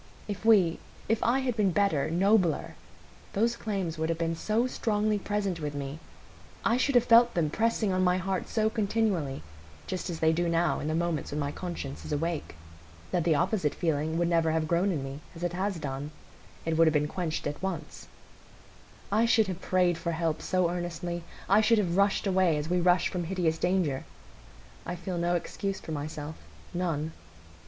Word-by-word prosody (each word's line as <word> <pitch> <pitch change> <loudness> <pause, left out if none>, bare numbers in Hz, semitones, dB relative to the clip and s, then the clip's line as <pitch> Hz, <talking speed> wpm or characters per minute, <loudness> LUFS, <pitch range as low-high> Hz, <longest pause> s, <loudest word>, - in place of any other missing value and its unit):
If 205 -1 -5
we—if 215 +1 +2
I 255 +3 +3
had 250 -3 -1
been 210 -3 +3
better, 175 -6 +1
nobler, 185 -1 +2 0.6
those 230 +4 +2
claims 190 -8 -3
would 160 +1 0
have 165 - 0
been 165 0 -1
so 215 +7 +1
strongly 215 -4 0
present 200 -3 -2
with 150 -2 -4
me,—I 145 +10 -5
should 265 +1 +1
have 245 - +6
felt 240 0 +6
them 160 -4 +1
pressing 225 -1 +1
on 185 0 +1
my 180 0 +3
heart 190 0 -2
so 220 -1 +1
continually, 205 - 0 0.4
just 185 0 -4
as 165 -2 -4
they 160 0 +3
do 170 +1 0
now 170 0 +1
in 150 - -4
the 155 - 0
moments 170 -2 -1
when 150 - -3
my 145 -1 -1
conscience 165 -5 -6
is - - -7
awake,—that 85 - -4
the 160 -2 +3
opposite 170 -1 +1
feeling 160 -1 0
would 170 0 +2
never 165 -1 +2
have 160 0 0
grown 175 +4 +2
in 150 -6 -2
me, 135 +1 -6 0.2
as 165 - -8
it 175 -1 -1
has 190 +1 -1
done; 140 -1 -4 0.6
it 160 -1 0
would 165 - +7
have 160 - +3
been 150 0 +2
quenched 160 -1 -3
at 145 0 -4
once, 175 -5 -5 1.0
I 220 +3 +3
should 225 -2 +4
have 185 -1 -5
prayed 180 -2 +2
for 170 -1 -2
help 160 -1 -1
so 180 -1 +1
earnestly, 175 0 -3 0.3
I 200 +3 +5
should 230 +1 +4
have 180 -5 +1
rushed 200 +2 +2
away 185 -5 +3
as 150 +1 -3
we 180 0 +2
rush 175 0 +4
from 175 -2 -3
hideous 165 -3 0
danger. 175 -7 +1 0.8
I 175 - -4
feel 175 0 -4
no 175 +1 +1
excuse 195 +3 -3
for - - -8
myself, 150 +1 -5 0.4
none. 165 -3 -1
175 Hz, 185 wpm, -29 LUFS, 160-195 Hz, 1.0 s, would